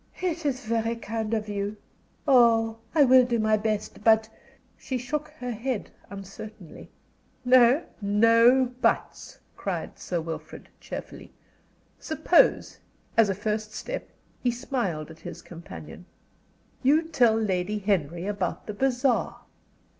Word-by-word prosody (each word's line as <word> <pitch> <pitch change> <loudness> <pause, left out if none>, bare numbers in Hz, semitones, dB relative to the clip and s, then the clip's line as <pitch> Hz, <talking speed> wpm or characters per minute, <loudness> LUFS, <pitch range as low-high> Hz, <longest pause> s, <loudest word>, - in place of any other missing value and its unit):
"It 340 -4 -2
is 260 -3 -2
very 230 +1 0
kind 225 -1 -4
of 215 -1 -3
you. 205 +1 -3 0.5
Oh, 225 -3 +4 0.2
I 300 - +7
will 255 -1 +7
do 240 -1 0
my 215 -1 +3
best. 215 -1 -3
But 220 0 +5 0.3
" - - -34
She 260 - -3
shook 295 +5 -3
her 250 -4 -4
head 240 0 -3 0.2
uncertainly. 195 -2 -10 0.6
"No 255 +4 +6 0.2
no 230 +5 +5 0.2
'buts,'" - - -1 0.2
cried - - -5
Sir 175 - -2
Wilfrid, 165 0 -7
cheerfully. - - -8 0.7
"Suppose, 340 +9 +2 0.4
as 225 -3 +5
a 195 - 0
first 215 +1 -3
step," - - -5 0.3
he 250 - +1
smiled 235 - -3
at 160 - -14
his - - -9
companion, 170 +1 -11 0.7
"you 295 +5 +4
tell 250 -9 +3
Lady 205 -2 -1
Henry 175 -4 -1
about 205 0 -3
the 210 - -5
bazaar?" 255 +2 0
225 Hz, 130 wpm, -26 LUFS, 205-255 Hz, 0.7 s, I